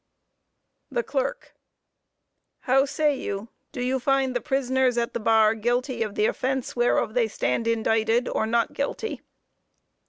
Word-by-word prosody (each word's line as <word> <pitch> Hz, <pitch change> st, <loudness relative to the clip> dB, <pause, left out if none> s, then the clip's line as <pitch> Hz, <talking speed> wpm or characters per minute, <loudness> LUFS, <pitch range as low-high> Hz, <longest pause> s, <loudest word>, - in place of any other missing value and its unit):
THE 485 Hz, -, -1 dB
CLERK: -, -, -3 dB, 1.1 s
How 270 Hz, +1 st, +3 dB
say 290 Hz, +1 st, +1 dB
you, 200 Hz, -3 st, -5 dB, 0.2 s
do 245 Hz, -, -4 dB
you 260 Hz, +1 st, 0 dB
find 265 Hz, 0 st, +1 dB
the 245 Hz, -, 0 dB
prisoners 260 Hz, -3 st, +1 dB
at 235 Hz, 0 st, -1 dB
the -, -, -2 dB
bar 220 Hz, -1 st, +4 dB
guilty 240 Hz, +2 st, -1 dB
of 215 Hz, -2 st, -2 dB
the 210 Hz, -, +2 dB
offense 260 Hz, +2 st, -1 dB
whereof 240 Hz, -2 st, +1 dB
they 240 Hz, -2 st, +2 dB
stand 165 Hz, -, -1 dB
indicted, 225 Hz, +1 st, +1 dB
or 220 Hz, -, -1 dB
not 230 Hz, 0 st, +1 dB
guilty? 285 Hz, +10 st, -3 dB
245 Hz, 145 wpm, -25 LUFS, 225-265 Hz, 1.1 s, bar